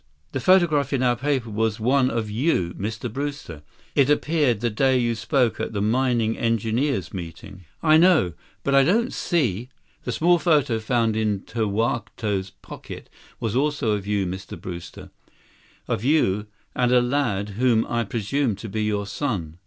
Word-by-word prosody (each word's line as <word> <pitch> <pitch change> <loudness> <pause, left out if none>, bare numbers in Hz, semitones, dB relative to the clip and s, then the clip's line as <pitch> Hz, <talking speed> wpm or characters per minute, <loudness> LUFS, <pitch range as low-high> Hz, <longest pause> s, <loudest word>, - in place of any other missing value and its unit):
"The 135 - -2
photograph 150 -3 +3
in 130 -2 +1
our 125 -1 +3
paper 130 -2 -1
was 110 +1 -1
one 130 +3 +3
of 115 -3 -2
you, 105 - 0
Mr. 110 +4 -5
Brewster. 135 - -5 0.3
It 140 -1 +3
appeared 150 -6 +2
the 120 0 -1
day 130 +4 +2
you 120 -1 +1
spoke 115 +2 0
at - - -3
the 100 - -2
mining 115 0 +1
engineers' 115 - 0
meeting." 95 +1 -8 0.2
"I 155 -1 +6
know. 165 - +4 0.3
But 140 - 0
I 135 0 +6
don't 225 - +1
see—" 125 - -1 0.3
"The 125 - -3
small 175 +7 +3
photo 150 -9 +2
found 115 -1 0
in 105 -3 0
Tokawto's 110 -2 -2
pocket - - -10 0.3
was 115 -1 -2
also 140 -4 +1
of 100 -1 -2
you, 100 -2 0
Mr. 95 +2 -6
Brewster. 85 -2 -8 0.8
Of 105 - -2
you 110 -8 +2 0.3
and 125 -1 +2
a 125 - +6
lad 120 -6 0
whom 115 +2 +2
I 120 0 -1
presume 115 +3 -1
to 105 +3 -8
be 110 +2 -2
your 105 -1 -1
son. 100 - -4
115 Hz, 160 wpm, -23 LUFS, 105-140 Hz, 0.8 s, I